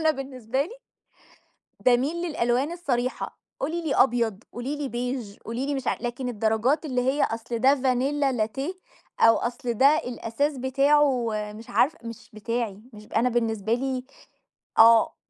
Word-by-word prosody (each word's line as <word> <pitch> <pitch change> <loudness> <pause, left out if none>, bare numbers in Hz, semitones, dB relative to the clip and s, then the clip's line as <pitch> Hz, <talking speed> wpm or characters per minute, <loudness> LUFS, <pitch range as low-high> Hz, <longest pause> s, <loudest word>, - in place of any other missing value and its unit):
أنا 315 -1 +4
بالنسبة 265 -2 -2
لي 400 +11 -8 1.1
بامِيل 255 +6 +2
للألوان 260 -1 0
الصريحة، 255 -8 -2 0.2
قولي 330 +5 -2
لي 310 -4 -1
أبيض، 230 -4 +2
قولي 250 +5 -4
لي 290 -2 -4
beige 240 -4 -4
قولي 235 +4 -3
لي 285 0 -1
مش 265 -2 -4
ع - - +1
لكن 245 +1 -3
الدرجات 225 +7 +1
اللي 250 -3 0
هي 265 +3 +1
أصْل 230 +1 -2
ده 270 +3 +5
vanilla 270 +1 +1
latte 270 - -2 0.5
أو 225 0 +7
أصْل 240 0 -2
ده 275 +6 +5
الأساس 250 +3 -2
بتاعه 270 -1 +3 0.2
مش 220 +1 -11
عارفة 310 +5 +2
مش 230 -1 -9
بتاعي، 220 -2 -3
مش 210 0 -11
أنا 250 - +3
بالنسبة 225 -2 0
لي 260 0 -2 0.7
آه، 225 0 +7
250 Hz, 150 wpm, -25 LUFS, 230-275 Hz, 1.1 s, أو